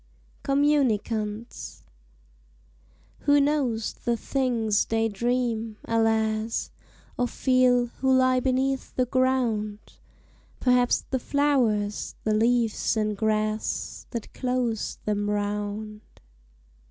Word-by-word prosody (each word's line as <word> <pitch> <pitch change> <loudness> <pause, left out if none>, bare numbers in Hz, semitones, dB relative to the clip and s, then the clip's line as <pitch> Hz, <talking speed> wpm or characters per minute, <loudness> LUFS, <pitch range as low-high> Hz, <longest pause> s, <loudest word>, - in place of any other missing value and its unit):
COMMUNICANTS 235 -6 0 1.4
Who 290 0 +4
knows 275 -6 0
the 235 -1 -2
things 230 -6 0
they 225 0 +1
dream, 230 0 -1
alas! 220 0 0 0.5
Or 245 - +2
feel, 255 -1 +3
who 265 0 +2
lie 255 0 +4
beneath 265 +1 -1
the 255 - +2
ground? 240 -5 -1 0.6
Perhaps 250 -1 +3
the 260 - +1
flowers, 240 -8 0
the 215 - +1
leaves, 230 0 +1
and 215 -1 0
grass 215 0 -2
That 235 -3 -6
close 250 -3 -1
them 205 -1 0
round. 210 +1 -3
230 Hz, 90 wpm, -26 LUFS, 215-255 Hz, 1.4 s, Who